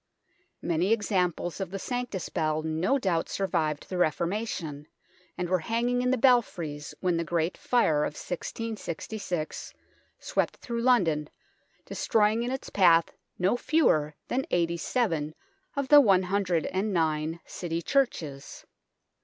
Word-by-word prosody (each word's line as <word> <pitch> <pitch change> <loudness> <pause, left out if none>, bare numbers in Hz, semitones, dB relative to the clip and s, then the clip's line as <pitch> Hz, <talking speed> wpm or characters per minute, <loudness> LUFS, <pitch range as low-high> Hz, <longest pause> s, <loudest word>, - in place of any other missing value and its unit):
Many 175 +4 +1
examples 185 -5 0
of 190 - -3
the 195 - -4
Sanctus 245 -2 -4
Bell 155 -2 -1
no 160 - +1
doubt 185 -9 0
survived 160 -6 -1
the 185 - -4
Reformation, 170 -3 -1 0.5
and 180 - -2
were 185 +1 +2
hanging 235 +7 0
in 250 - +1
the 260 - +2
belfries 180 - +1
when 180 -2 +1
the 170 - 0
Great 170 +1 -1
Fire 160 -12 +2
of 150 - -3
1666 185 -3 -5 0.4
swept - - -1
through 235 -1 -4
London, 170 -12 +2 0.6
destroying 215 +1 +1
in 240 - -2
its 265 +1 -5
path 170 -4 +4 0.2
no 185 +5 +2
fewer 155 - +2
than 265 +2 -1
eighty 170 -1 +1
seven 165 - -1 0.4
of 280 -1 -2
the 295 -1 +9
one 195 -7 +4
hundred 185 -3 0
and 190 +3 -1
nine 160 -2 0
City 170 -2 -4
churches. 160 - -1
180 Hz, 135 wpm, -28 LUFS, 160-230 Hz, 0.6 s, the